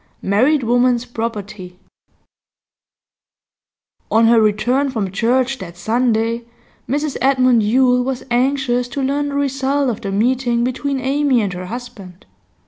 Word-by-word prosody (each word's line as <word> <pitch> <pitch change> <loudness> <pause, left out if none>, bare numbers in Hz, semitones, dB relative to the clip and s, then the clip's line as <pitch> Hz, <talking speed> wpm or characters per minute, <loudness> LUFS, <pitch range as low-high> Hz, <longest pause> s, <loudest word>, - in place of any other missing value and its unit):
MARRIED 255 +9 +2
WOMAN'S 245 +1 +2
PROPERTY 210 -6 -6 2.3
On 225 +1 +4
her 230 0 +5
return 225 +7 +1
from 215 -7 -3
church 250 +6 0
that 175 -3 -9
Sunday 230 +2 0 0.4
Mrs 290 +2 -1
Edmund 255 -3 +3
Yule 250 +3 +3
was 260 0 -3
anxious 250 -1 +1
to 270 +3 -4
learn 285 +2 -1
the 280 - -5
result 275 -1 0
of 225 - -7
the 200 -3 -4
meeting 240 +3 +1
between 265 +2 -2
Amy 270 0 +1
and 200 -4 -2
her 180 0 -7
husband. 200 -5 -9
245 Hz, 130 wpm, -18 LUFS, 220-265 Hz, 2.3 s, her